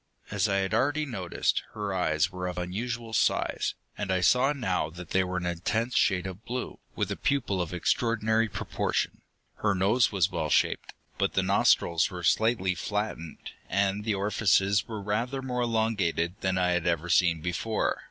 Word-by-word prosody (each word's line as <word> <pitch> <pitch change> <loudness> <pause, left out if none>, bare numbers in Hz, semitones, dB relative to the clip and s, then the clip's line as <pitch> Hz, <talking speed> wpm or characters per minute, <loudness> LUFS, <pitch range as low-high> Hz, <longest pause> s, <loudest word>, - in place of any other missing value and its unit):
As 100 0 +1
I 100 - +1
had 95 +1 0
already 145 +6 +1
noticed, 95 -10 -1
her 105 -2 -3
eyes 85 -1 +1
were 90 -1 -4
of 90 - -5
unusual 115 +6 -4
size, - - +1 0.2
and 100 -2 -3
I 95 - +2
saw 125 +9 +4
now 95 - -1
that 85 +1 -10
they 95 - +3
were 90 0 -3
an 90 - -3
intense 110 +8 -1
shade 95 -6 +2
of 95 +3 -7
blue, 125 +2 -5 0.2
with - - -1
a - - -1
pupil 135 -9 0
of 85 - -3
extraordinary 110 +4 +1
proportion. - - -2 0.4
Her 105 -2 +1
nose 105 +7 +3
was 95 -1 +1
well 80 -3 -2
shaped, - - +1 0.3
but - - +1
the - - +2
nostrils 85 -1 +3
were 90 -1 -7
slightly 105 +1 +2
flattened, 105 -3 -4 0.2
and 100 +2 +1
the 110 -1 0
orifices 100 0 +2
were 110 -3 -6
rather 120 +6 -2
more 125 -1 -2
elongated 110 -8 0
than 95 -1 0
I 90 -1 +2
had 90 0 0
ever 85 -1 0
seen 85 -1 +3
before. 90 +6 -1
100 Hz, 175 wpm, -28 LUFS, 90-115 Hz, 0.4 s, saw